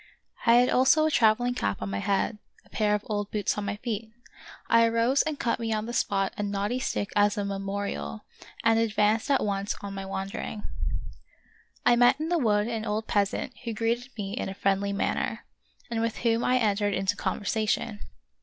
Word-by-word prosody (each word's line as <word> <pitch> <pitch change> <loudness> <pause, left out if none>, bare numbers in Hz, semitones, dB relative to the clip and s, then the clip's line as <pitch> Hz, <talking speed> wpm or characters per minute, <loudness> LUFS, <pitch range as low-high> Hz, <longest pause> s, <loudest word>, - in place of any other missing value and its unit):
I 230 - +7
had 245 +1 +5
also 265 +5 +5
a 315 - +2
traveling 245 0 +3
cap 100 - -2
on 100 0 -4
my 100 - -2
head, 200 - 0 0.3
a - - -23
pair 210 -1 +2
of 210 - -3
old 205 -1 -2
boots 210 -2 0
on 210 - -3
my 200 0 -2
feet. 220 0 -4 0.6
I 230 0 +5
arose 230 +4 +3
and 310 -2 -3
cut 235 - 0
me 225 -1 -2
on 215 0 -1
the 240 - -5
spot 195 -5 0
a - - -2
knotty 205 +4 -1
stick 205 -5 -2
as 205 +1 +3
a 205 - -1
memorial, 195 - -4 0.4
and 225 0 +4
advanced 220 +1 +2
at 275 -5 +3
once 200 0 -1
on 200 -1 -6
my 195 0 -5
wandering. 195 +2 -4 1.2
I 240 - +6
met 245 +3 +5
in 315 +1 -2
the 345 -1 +2
wood 210 -4 +2
an 225 -2 -3
old 215 0 -2
peasant 205 +5 0
who 230 -2 -4
greeted 235 +3 -1
me 200 -1 -4
in 235 - -3
a 195 - -6
friendly 195 0 +1
manner, 200 - -1 0.5
and 225 -1 0
with 230 -1 -1
whom 230 0 +3
I 255 - +3
entered 205 -3 +1
into 195 +1 0
conversation. 215 +1 -1
215 Hz, 195 wpm, -27 LUFS, 200-230 Hz, 1.2 s, I